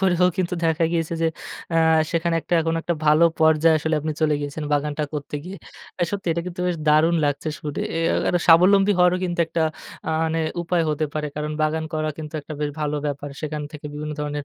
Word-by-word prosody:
করেও 180 -1 +4
কিন্তু 180 0 0
দেখা 160 0 +2
গিয়েছে 165 0 -1
যে, - - +3 0.5
আ - - +3 0.3
সেখানে 170 0 0 0.3
এখন 165 0 0
একটা 170 - -1
ভালো 155 +3 +6 0.2
পর্যায়ে 160 0 +5
আসলে 160 +1 -1
আপনি 155 +1 -2
চলে 155 -1 +3
গিয়েছেন 145 +1 -5
বাগানটা 150 +1 0
করতে 145 0 -5
গিয়ে। 190 +2 -7 0.4
আ - - +3
সত্যি 200 -2 -4
এটা 170 +1 -2
কিন্তু 180 0 -6
বেশ 175 -2 0
দারুণ 155 +3 +5
লাগছে 145 +2 -1
শুদে 150 -2 -4
এ - - 0
আ - - +1
এটা 175 - +1
স্বাবলম্বী 195 +4 +6
হওয়ারও 180 0 +5
কিন্তু 175 -1 -3
একটা 165 0 -1 0.5
আ - - +1 0.2
মানে 165 0 -1 0.2
উপায় 170 0 +1
হতে 155 +1 0
পারে। 150 -1 -2
কারণ 150 0 -3
বাগান 160 +1 0
করা 155 0 -1
কিন্তু 155 0 -7
একটা 155 - -10
বেশ 145 -1 -1
ভালো 150 0 -1
ব্যাপার। 145 0 -4
সেখান 150 -1 -4
থেকে 150 0 -8
বিভিন্ন 150 +1 -4
ধরনের 145 -1 -3
160 Hz, 210 wpm, -23 LUFS, 150-170 Hz, 0.5 s, ভালো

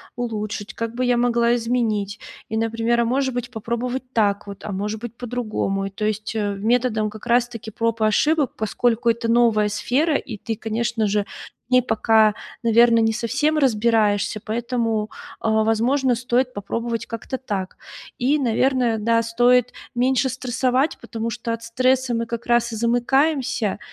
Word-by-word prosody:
улучшить, 215 -2 -4
как 230 0 -4
бы 255 - -1
я 245 -1 +2
могла 235 -1 +2
изменить. 225 -4 -1 0.3
И, 220 - -4
например, 230 +1 +1
а - - +1
может 260 +2 0
быть, 245 0 -4
попробовать 235 +3 -3
так 205 -2 +1
вот, 200 -1 -9
а 210 - -5
может 210 +3 -3
быть, 240 -1 -7
по-другому. 215 -5 -2
И - - -5
то 205 +2 -4
есть, 215 +1 -2
э-э, 205 -2 -1
методом 220 0 +1
как 215 +2 -11
раз 240 0 +2
таки 225 -2 -8
проб 230 +1 -1
и - - +4
ошибок, 295 +6 +2
поскольку 230 +2 0
это 230 0 0
новая 230 -3 +4
сфера 285 +9 0
и 225 -5 -3
ты, 225 +2 -4
конечно 225 0 -1
же, 205 0 0 0.4
в - - -28
ней 255 - +7
пока, 220 -2 +3 0.3
наверно, 230 0 +5
не 225 0 +2
совсем 270 +7 0
разбираешься, 220 -5 +2
поэтому, 225 -1 -1 0.3
а-а, 220 0 +2
возможно, 245 +4 +2
стоит 250 +1 0
попробовать 230 +3 -3
как-то 230 +3 -5
так. 200 -7 -4 0.4
И, 275 +5 +2
наверное, 250 -2 +1
да, 230 +2 +2
стоит 245 +1 +3 0.2
меньше 260 +2 +2
стрессовать, 255 +3 0
потому 230 0 -4
что 230 0 -3
от 230 0 -6
стресса 255 +2 +1
мы 230 0 -1
как 235 +1 -5
раз 235 -1 +2
и - - -3
замыкаемся, 245 0 +1
230 Hz, 165 wpm, -22 LUFS, 220-245 Hz, 0.4 s, ней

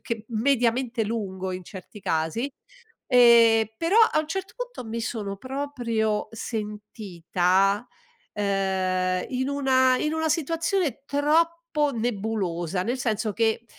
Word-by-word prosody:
che 230 -2 -5
mediamente 240 0 +1
lungo 195 -4 -3
in 185 -1 -6
certi 190 +3 -11
casi. 165 - -1 0.6
Ehm, 235 -3 +6
però 345 - +2
a 310 - +3
un 310 - -7
certo 385 +3 -4
punto - - -6
mi 230 +1 -4
sono 210 -4 -4
proprio 235 -5 -2
sentita, 205 -2 -1 0.5
ehm, 190 -2 0
in 260 +1 -1
una 260 -2 +3
in 305 - -1
una 320 0 0
situazione 330 0 0
troppo 315 +4 +2 0.4
nebulosa, 195 -6 -2
nel 245 +6 -2
senso 220 -2 -1
che, 225 +1 0
225 Hz, 115 wpm, -25 LUFS, 200-270 Hz, 0.6 s, Ehm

